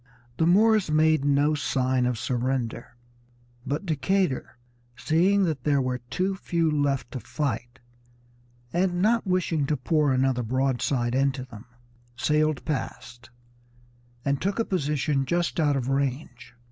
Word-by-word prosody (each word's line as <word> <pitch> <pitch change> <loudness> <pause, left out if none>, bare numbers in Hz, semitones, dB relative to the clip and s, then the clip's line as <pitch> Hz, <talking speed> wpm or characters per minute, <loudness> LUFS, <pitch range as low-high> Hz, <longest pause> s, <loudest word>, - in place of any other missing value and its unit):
The 165 - +2
Moors 215 +1 +4
made 155 -1 +3
no 145 +1 +3
sign 130 -3 0
of 125 -2 -1
surrender, 120 -1 -2 0.7
but 145 +8 -2
Decatur, 175 -3 -1 0.4
seeing 175 +9 +2
that 155 -8 -1
there 145 -2 +2
were 130 -1 -1
too 185 +8 0
few 170 -4 -1
left 145 -3 0
to 130 - -5
fight, 120 -4 -4 1.0
and 175 0 +1
not 230 0 +2
wishing 170 -5 0
to 150 - 0
pour 150 +2 +1
another 130 -1 +1
broadside 125 0 0
into 135 0 +1
them, 115 -3 -12 0.5
sailed 150 +3 +1
past, 120 -4 -5 1.0
and 140 -1 0
took 195 +1 -1
a 230 - +1
position 150 -5 0
just 170 +6 -1
out 145 -3 +2
of 130 -2 -2
range. 130 -3 -3
140 Hz, 135 wpm, -26 LUFS, 130-165 Hz, 1.0 s, Moors